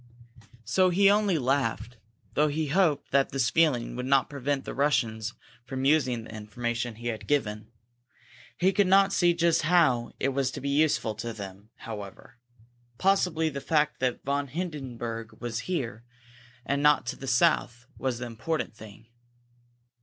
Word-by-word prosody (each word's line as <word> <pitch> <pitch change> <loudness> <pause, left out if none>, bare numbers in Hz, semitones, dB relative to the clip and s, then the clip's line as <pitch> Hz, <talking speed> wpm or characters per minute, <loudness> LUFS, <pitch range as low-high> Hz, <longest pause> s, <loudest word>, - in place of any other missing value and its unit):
So 185 - +3
he 195 +3 +5
only 205 -4 +2
laughed, 125 -3 -1 0.4
though 150 +1 +3
he 150 0 -2
hoped 165 -3 +1
that 140 0 +3
this 130 -2 0
feeling 145 -9 +2
would 125 +1 -4
not 135 0 +3
prevent 140 0 -2
the - - -5
Russians 115 -6 0 0.3
from 130 +1 -4
using 135 -6 +2
the 110 - -11
information 120 +2 -3
he 120 +2 -4
had 110 -2 -5
given. 105 -7 -1 0.9
He 190 +2 +2
could 200 0 +3
not 195 +1 +5
see 175 -2 +3
just 170 -1 +2
how 155 -8 +2
it 135 - +1
was 135 -1 0
to - - -5
be 140 - -3
useful 140 -6 +2
to 115 +1 -4
them, 100 0 -9
however. 105 +2 -9 0.6
Possibly 180 -4 +2
the 140 -2 -6
fact 150 -1 +1
that 125 -1 -1
von 140 +1 -1
Hindenburg 120 -8 -5
was 120 -1 -3
here, 120 -10 -3 0.6
and 140 0 0
not 150 -3 +4
to 120 - -3
the 135 - -9
south, 125 -3 +2
was 130 -3 -1
the 125 - -5
important 120 +7 -3
thing. 110 0 -13
135 Hz, 160 wpm, -27 LUFS, 120-155 Hz, 0.9 s, he